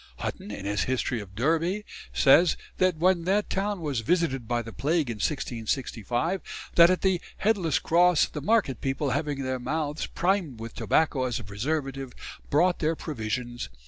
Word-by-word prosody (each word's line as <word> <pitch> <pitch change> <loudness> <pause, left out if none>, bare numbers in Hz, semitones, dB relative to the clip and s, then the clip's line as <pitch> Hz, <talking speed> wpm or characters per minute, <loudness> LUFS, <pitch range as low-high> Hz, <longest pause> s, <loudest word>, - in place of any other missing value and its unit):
Hutton, - - -5
in 100 -1 -6
his 100 -2 0
"History 125 -2 -1
of 95 -2 -12
Derby," 165 - 0 0.3
says 165 +5 +5 0.2
that 185 -3 +3
when 175 0 +2
that 200 +3 +1
town 200 -1 -1
was 145 -6 -1
visited 135 -2 0
by 120 0 0
the 115 0 -9
plague 150 -2 0
in 115 - -6
1665, 125 - -2 0.3
that 170 0 +8
at 185 - +1
the 190 -3 +2 0.2
"Headless 195 -8 +1
cross... 175 -1 +4
the 150 - -7
market 195 - +1
people, 135 +1 -1
having 145 -1 -1
their 130 0 -2
mouths 150 +3 -2
primed 175 - 0
with 115 0 -7
tobacco 145 -5 +1
as 125 -2 -1
a - - -8
preservative, 135 +5 -3 0.4
brought 175 +5 +3
their 160 +1 +1
provisions.... 120 - -4
145 Hz, 165 wpm, -27 LUFS, 120-175 Hz, 0.4 s, that